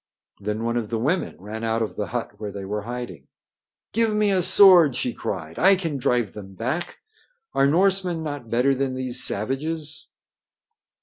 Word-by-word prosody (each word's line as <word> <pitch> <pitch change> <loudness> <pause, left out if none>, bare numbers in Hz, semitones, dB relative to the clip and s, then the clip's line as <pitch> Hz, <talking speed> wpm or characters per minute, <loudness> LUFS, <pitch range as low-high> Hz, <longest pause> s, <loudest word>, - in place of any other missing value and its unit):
Then 105 +2 -3
one 115 +1 -1
of 110 -3 -3
the 115 - -1
women 150 +11 -1
ran 105 +4 -7
out 115 0 0
of 110 - -5
the 105 - -3
hut 120 0 -4
where 105 -2 -5
they 100 -1 -7
were 105 +2 -3
hiding. 120 - -7 0.7
"Give 225 -1 +1
me 210 -1 +2
a 190 -2 +2
sword!" 175 -7 +7
she 125 - -1
cried. 80 +1 -5
"I 195 +3 +6
can 165 -6 -3
drive 120 -5 0
them 95 -2 -10
back. 130 - -3 0.6
Are 135 - +3
Norsemen 180 +1 +2
not 145 -6 -6
better 125 +4 +2
than 135 -1 -2
these 130 -1 -1
savages?" 155 +8 -3
130 Hz, 175 wpm, -23 LUFS, 110-165 Hz, 0.7 s, sword